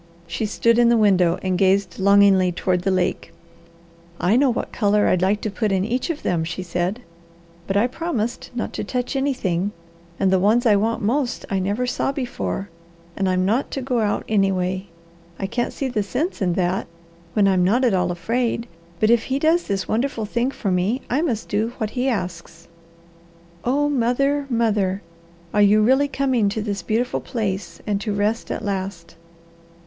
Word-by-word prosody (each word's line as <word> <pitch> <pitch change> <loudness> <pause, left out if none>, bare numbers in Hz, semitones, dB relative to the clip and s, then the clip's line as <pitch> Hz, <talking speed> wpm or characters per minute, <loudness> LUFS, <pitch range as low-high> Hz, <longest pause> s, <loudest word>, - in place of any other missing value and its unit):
She 170 +6 -3
stood 230 +2 +2
in 240 -1 +5
the 235 - +4
window 185 -5 +3
and 185 -1 0
gazed 195 -1 +2
longingly 195 -2 +5
toward 180 +1 0
the 195 - 0
lake. 185 -1 -1 0.9
"I 190 +5 +2
know 270 +2 +4
what 240 - -2
colour 210 -1 +2
I'd 180 - +2
like 200 +3 +1
to 215 - -3
put 215 0 -1
in 190 0 +1
each 245 +8 -2
of 320 -3 -3
them," 170 -2 0
she 170 +3 -4
said, 180 +6 -2 0.7
"but 195 - 0
I 210 - +4
promised 255 -4 -3
not 240 - -3
to - - -3
touch 250 +5 -3
anything, 210 -9 -1 0.5
and 190 -1 +2
the 190 - +4
ones 220 +6 +3
I 215 -3 +5
want 220 +3 0
most 245 +4 0
I 195 - +1
never 205 +6 -1
saw 250 +2 -1
before, 245 -7 -3 0.5
and 195 -1 0
I'm 185 0 +1
not 230 +8 +1
to 270 - -2
go 250 -2 0
out 210 -2 0
anyway. 190 -2 0 0.5
I 195 - -3
can't 235 +4 -2
see 275 - -3
the 240 -5 -1
sense 260 - -3
in 180 -2 +1
that, 180 +1 0 0.5
when 205 -2 +3
I'm 185 -2 +3
not 235 +8 +3
at 235 - +3
all 180 -1 +1
afraid, 230 +6 -1 0.3
but 215 +1 +3
if 235 -1 +3
he 265 - -1
does 320 +4 +2
this 195 -2 -2
wonderful 230 -1 -1
thing 235 +4 0
for 210 -7 -3
me 190 +8 0
I 270 +5 +2
must 240 -10 -2
do 220 +3 -1
what 215 -3 -2
he 255 +3 0
asks. 175 -6 -5 1.0
Oh 285 +4 +1
mother, 275 +2 +1
mother! 210 -5 0 0.5
Are 210 - +3
you 210 +1 +5
really 265 +5 +4
coming 260 -7 +1
to 215 +2 -3
this 200 -3 -3
beautiful 235 +6 -1
place 200 -7 -4
and 205 -1 -1
to 215 - -2
rest 210 +3 -1
at 220 - -4
last?" 185 -4 -4
210 Hz, 185 wpm, -22 LUFS, 190-245 Hz, 1.0 s, in